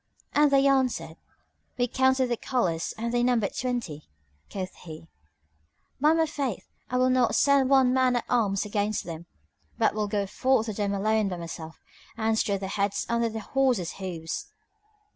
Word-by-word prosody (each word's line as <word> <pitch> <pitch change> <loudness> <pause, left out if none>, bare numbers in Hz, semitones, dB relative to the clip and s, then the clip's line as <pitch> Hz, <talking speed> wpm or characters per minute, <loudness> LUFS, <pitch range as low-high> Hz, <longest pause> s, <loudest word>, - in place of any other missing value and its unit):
And 295 0 +5
they 275 0 +4
answered, 265 -2 +1 0.6
"We 245 0 +1
counted 260 +1 +2
the 240 - +1
colours 175 -12 -1
and 235 +1 -3
they 240 - +2
numbered 240 -4 +1
twenty." 235 - -4 0.4
Quoth 185 -2 -5
he, 160 -2 -10 0.9
"By 300 +3 +4
my 325 0 +3
faith, 275 - -3 0.2
I 250 - 0
will 255 0 +3
not 255 -2 +2
send 280 -2 +4
one 265 -2 +5
man 255 -1 +3
at 240 - -1
arms 210 -5 +1
against 210 0 -1
them, 165 0 -8 0.5
but - - +2
will 210 -1 -1
go 200 -1 -1
forth 255 +4 +1
to 220 - -4
them 200 -1 -1
alone 215 +1 +1
by 180 - -4
myself 165 -1 -8 0.4
and 220 0 +1
strew 200 -2 +1
their 190 0 -5
heads 200 0 -1
under 235 0 +1
the 220 0 -5
horses' 250 -8 0
hooves!" 180 - -5
225 Hz, 170 wpm, -27 LUFS, 195-255 Hz, 0.9 s, And